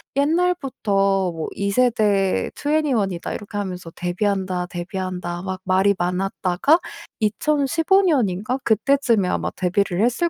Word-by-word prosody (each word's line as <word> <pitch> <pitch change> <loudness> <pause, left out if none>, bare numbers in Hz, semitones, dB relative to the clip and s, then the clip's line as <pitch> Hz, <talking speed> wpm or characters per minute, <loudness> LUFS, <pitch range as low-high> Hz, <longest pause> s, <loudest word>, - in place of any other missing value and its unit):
옛날부터 270 - +1
뭐 160 -1 -5
"2 200 0 -1
세대 210 -5 +2
2ne1이다." 260 - 0
이렇게 205 0 -7
하면서 185 -4 -4
"데뷔한다, 185 0 -1
데뷔한다." 180 0 -4
막 185 0 -5
말이 190 +1 +3
많았다가 185 - +1 0.4
2015 305 - +2
년인가 245 - +1
그때쯤에 230 -2 +2
아마 - - -1
데뷔를 185 +1 0
했을 260 +8 +1
200 Hz, 270 characters per minute, -22 LUFS, 185-265 Hz, 0.4 s, 말이